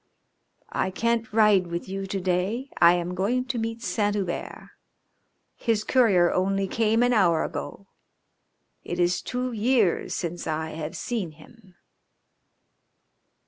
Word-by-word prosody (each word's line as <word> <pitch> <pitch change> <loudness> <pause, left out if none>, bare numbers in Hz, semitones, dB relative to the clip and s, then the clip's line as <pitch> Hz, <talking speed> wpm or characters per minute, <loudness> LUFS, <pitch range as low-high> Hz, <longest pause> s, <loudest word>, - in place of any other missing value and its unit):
"I - - 0
can't 230 +3 -1
ride 210 -4 +4
with 170 0 -5
you 195 0 -4
to 195 0 -3
day. 190 +9 -1
I 170 0 +8
am 175 0 -3
going 225 +8 0
to 255 -2 -3
meet 225 +1 -4
Saint 205 -3 0
Hubert. 190 -4 -4 0.8
His 225 -3 0
courier 200 -9 +3
only 195 +1 0
came 225 +3 +2
an 245 0 +3
hour 175 -7 +3
ago. 200 - -6 1.0
It 175 - -5
is 175 0 +2
two 250 0 -3
years 225 -4 +1
since 175 -1 -4
I 160 0 -2
have 155 0 -6
seen 205 -10 -3
him." 190 +4 -19
195 Hz, 135 wpm, -25 LUFS, 175-230 Hz, 1.0 s, I